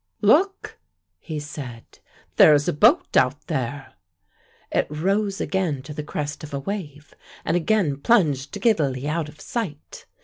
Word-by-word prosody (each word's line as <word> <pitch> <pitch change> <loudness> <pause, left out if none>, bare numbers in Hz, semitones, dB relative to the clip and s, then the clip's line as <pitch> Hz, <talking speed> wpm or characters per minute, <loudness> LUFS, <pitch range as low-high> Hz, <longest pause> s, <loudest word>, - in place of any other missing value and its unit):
"Look," 370 - +2 0.4
he 155 -3 -5
said, 135 -6 -9 0.4
"there 150 - +8
is 145 0 0
a - - +1
boat 145 - +3
out 130 +2 +2
there." 135 +2 -4 0.8
It - - +1
rose 195 +6 -1
again 170 -9 -1
to 150 - -8
the 150 - -4
crest 150 0 -5
of 150 -2 -6
a - - -2
wave 150 -3 -6 0.3
and - - +1
again 175 -4 +1
plunged 150 - +1
giddily 145 - +1
out 155 0 -2
of 150 - -16
sight. 185 -12 -6
150 Hz, 145 wpm, -23 LUFS, 145-195 Hz, 0.8 s, there